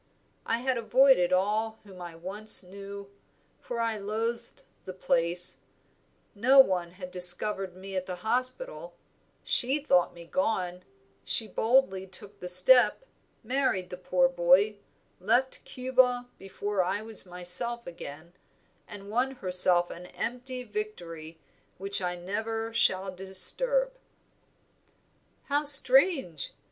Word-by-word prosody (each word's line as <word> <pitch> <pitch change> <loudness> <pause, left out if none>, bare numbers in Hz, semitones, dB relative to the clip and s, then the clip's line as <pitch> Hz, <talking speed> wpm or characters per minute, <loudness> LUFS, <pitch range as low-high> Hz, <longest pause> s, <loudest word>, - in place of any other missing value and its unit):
I 230 +1 -1
had 255 -1 -1
avoided 245 -5 +4
all 215 +4 0
whom 190 -3 -14
I 175 -1 -9
once 200 +5 +2
knew, 200 +1 -10 0.5
for 240 -1 -6
I 225 -2 -1
loathed 225 +3 -4 0.2
the 185 - -8
place; 175 -1 -1 0.8
no 250 +7 +3
one 180 -8 +3
had 180 -1 -10
discovered 180 +1 0
me 195 +1 -9
at 185 0 -3
the 180 - -5
hospital, 255 - -3 0.5
she 265 +4 +1
thought 180 -13 +1
me 170 0 -11
gone, 185 -6 -2 0.4
she 220 - +4
boldly 220 -3 +1
took 200 +2 -9
the 180 - -7
step, 245 - +4 0.4
married 235 -7 -1
the - - -5
poor 180 -1 +1
boy, 180 +4 +2 0.4
left 240 +8 0
Cuba 250 -1 0
before 195 0 -3
I 195 +4 -3
was 220 -3 -4
myself 180 +7 -1
again, 170 0 -10 0.5
and 200 -1 -11
won 250 +4 0
herself 180 -4 +5
an 180 +1 -10
empty 250 +4 -4
victory 170 -8 -7 0.4
which 195 +1 0
I 180 -1 -2
never 225 +5 -4
shall 190 -3 0
disturb." - - +2 1.5
"How 290 +1 -1
strange! 270 - +3
200 Hz, 120 wpm, -28 LUFS, 180-245 Hz, 1.5 s, herself